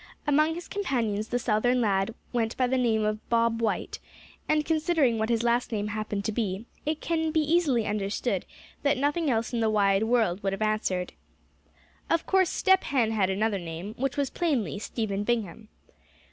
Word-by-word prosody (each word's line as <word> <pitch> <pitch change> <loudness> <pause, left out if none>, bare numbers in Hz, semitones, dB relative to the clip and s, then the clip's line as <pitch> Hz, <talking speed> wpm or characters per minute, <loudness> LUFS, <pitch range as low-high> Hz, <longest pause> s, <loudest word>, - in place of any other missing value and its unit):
Among 305 +2 +3
his 345 0 -7
companions 230 - -1
the 245 - -1
Southern 245 +1 +1
lad 200 -1 +1 0.2
went 230 -1 -1
by 255 - +3
the 255 +1 0
name 220 -3 +2
of 215 0 -3
"Bob 230 0 +2
White;" 220 -2 -1 0.5
and 305 -1 +2
considering 310 -7 +2
what 220 +1 0
his 230 -1 +1
last 240 +1 +1
name 210 -1 -2
happened 210 -2 -3
to - - 0
be, 205 -1 -2 0.2
it 310 0 -1
can 320 -1 0
be 315 0 +1
easily 300 -7 +2
understood 205 -1 -1 0.4
that 285 -2 +2
nothing 290 +3 +1
else 230 -1 0
in 235 - 0
the 225 -1 +2
wide 200 -1 +3
world 220 -6 +1
would 195 0 -1
have 195 - -5
answered. 215 -4 -1 1.0
Of 330 - +1
course 380 -2 +3
Step 380 0 +3
Hen 240 -6 +1
had 200 -4 +1
another 200 +1 0
name, 170 +4 -6
which 270 +4 -2
was 280 -2 0
plainly 275 - -1
Stephen 205 -2 -3
Bingham. 220 -2 -2
230 Hz, 180 wpm, -27 LUFS, 210-280 Hz, 1.0 s, Among